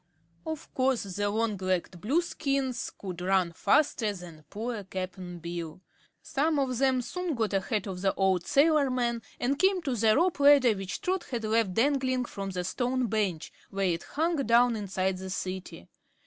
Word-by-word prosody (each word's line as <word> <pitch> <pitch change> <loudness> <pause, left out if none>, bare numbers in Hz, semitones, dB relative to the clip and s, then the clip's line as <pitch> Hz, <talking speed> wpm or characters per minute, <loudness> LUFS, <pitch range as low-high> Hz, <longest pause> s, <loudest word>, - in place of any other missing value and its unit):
Of 315 -2 -6
course 260 -2 +1
the 205 +1 -2
long 215 0 0
legged 185 -2 -2
Blueskins 275 - -1
could 180 -3 -6
run 185 -1 +2
faster 250 - +2
than 170 -5 -11
poor 225 0 -4
Cap'n 185 -1 -6
Bill. 170 0 -6 0.4
Some 305 +2 0
of 255 -3 0
them 260 -2 +2
soon 360 +2 -3
got 220 -3 -1
ahead 195 +1 0
of 185 -2 -5
the 195 0 +3
old 190 -3 +1
sailorman 275 -6 +3 0.2
and 275 +4 0
came 380 +1 +4
to 270 -5 -1
the 220 -1 +4
rope 345 -1 +2
ladder 280 -4 +6
which 195 -1 -5
Trot 370 0 -1
had 240 -3 -4
left 215 -3 +1
dangling 255 0 +2
from 195 -4 -5
the 180 -1 -3
stone 250 +7 -1
bench, 195 -7 -1 0.2
where 195 0 -1
it 170 -2 0
hung 325 +3 -1
down 240 -2 +4
inside 190 -2 -1
the 190 0 -6
City. 185 - -5
225 Hz, 165 wpm, -29 LUFS, 190-270 Hz, 0.4 s, ladder